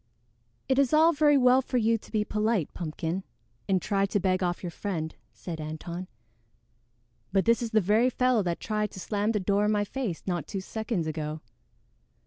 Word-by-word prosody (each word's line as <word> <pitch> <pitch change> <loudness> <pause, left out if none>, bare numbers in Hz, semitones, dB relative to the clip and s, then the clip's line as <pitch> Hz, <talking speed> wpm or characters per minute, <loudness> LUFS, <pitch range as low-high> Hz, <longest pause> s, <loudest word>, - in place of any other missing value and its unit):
"It 265 +1 +2
is 275 -1 +3
all 325 +2 +6
very 295 -1 +4
well 255 0 +5
for 255 - -2
you 230 -1 +3
to 225 - -8
be 215 -2 +1
polite, 210 -6 0
Pumpkin, 165 +2 -3 0.5
and 190 -1 +3
try 195 +1 0
to 205 - 0
beg 185 0 +1
off 175 0 -1
your 175 - -3
friend," 165 -4 -4 0.2
said 165 -3 -7
Antone, 170 +4 -6 1.2
"but 195 0 +2
this 230 +1 +3
is 235 - -2
the 220 -1 +3
very 215 +6 +3
fellow 250 -2 +2
that 175 -3 -2
tried 210 -1 -1
to - - -8
slam 205 +3 0
the 215 - 0
door 200 +1 +1
in 210 - +2
my 205 -1 +2
face 210 -6 -4
not 175 -5 -2
two 195 - -4
seconds 215 -2 -3
ago." 155 0 -4
205 Hz, 190 wpm, -28 LUFS, 175-230 Hz, 1.2 s, all